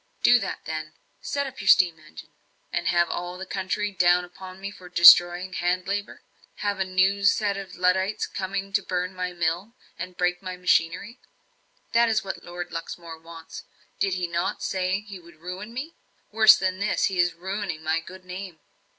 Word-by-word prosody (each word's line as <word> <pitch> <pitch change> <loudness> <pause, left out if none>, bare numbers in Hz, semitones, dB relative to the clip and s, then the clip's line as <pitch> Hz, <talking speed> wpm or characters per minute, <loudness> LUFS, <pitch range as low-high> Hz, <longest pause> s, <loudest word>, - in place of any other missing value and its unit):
"Do 245 0 +7
that, 195 - -5
then. 155 0 -5 0.3
Set 280 0 -2
up 265 -4 -8
your 195 - -7
steam 175 -4 +5
engine." 155 - -13 0.4
"And - - -1
have 175 -1 +2
all 175 +1 -4
the 190 - -7
country 195 +2 -2
down 180 -1 +3
upon 185 +1 -11
me 200 +1 -5
for 185 -3 -13
destroying 175 +1 +7
hand 180 +1 -1
labour? 200 +1 -4 0.4
Have 200 -1 0
a - - +2
new 190 +2 +2
set 200 0 +3
of 195 -2 -7
Luddites 190 +3 +1
coming 195 0 -4
to 200 - +3
burn 180 0 -3
my 180 -1 -3
mill, 175 +5 -2 0.3
and 185 0 -7
break 180 0 0
my 185 -1 -6
machinery? 180 +7 0 0.7
That 235 0 +4
is 220 -1 +1
what 195 - -6
Lord 175 0 -7
Luxmore 165 0 -7
wants. 165 0 -11 0.3
Did 195 -2 +1
he 180 -1 -1
not 170 0 -2
say 185 +1 -1
he 205 -3 -10
would 170 0 -17
ruin 180 +6 -8
me? 275 +7 -6 0.4
Worse 220 0 +8
than 185 0 -1
this 205 +1 +1
he 190 -2 -1
is 175 -1 +2
ruining 190 -2 -4
my 160 +1 +1
good 185 +2 -12
name. 185 -1 -7
185 Hz, 185 wpm, -25 LUFS, 175-200 Hz, 0.7 s, Worse